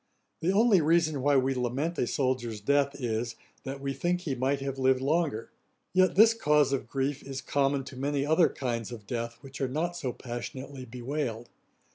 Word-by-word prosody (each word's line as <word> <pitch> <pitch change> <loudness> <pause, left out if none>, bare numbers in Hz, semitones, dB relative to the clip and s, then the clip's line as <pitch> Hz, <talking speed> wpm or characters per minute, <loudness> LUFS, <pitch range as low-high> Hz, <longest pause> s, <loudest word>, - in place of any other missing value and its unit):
The 170 +3 +1
only 205 -2 +5
reason 155 -2 +2
why 145 +1 +4
we 135 +1 +2
lament 130 +7 -2
a 120 - +1
soldier's 125 -5 -1
death, 140 +5 +1
is, 115 -1 -2 0.3
that 135 +1 -5
we 135 0 -3
think 175 +6 -1
he 155 -6 -2
might 135 +2 0
have 135 -1 -4
lived 130 0 +3
longer; 145 -4 0 0.4
yet 185 -1 +4
this 220 +3 +7
cause 150 - +3
of 135 - -2
grief 135 +1 -1
is 135 -1 -6
common 140 0 0
to 130 - -10
many 140 +1 -1
other 160 +3 +4
kinds 120 -4 -3
of 110 -4 -8
death 115 +1 -4
which 135 0 -9
are 135 - +1
not 165 +6 -1
so 135 -7 -3
passionately 130 +2 -7
bewailed. 120 -1 -4
135 Hz, 185 wpm, -29 LUFS, 125-150 Hz, 0.4 s, this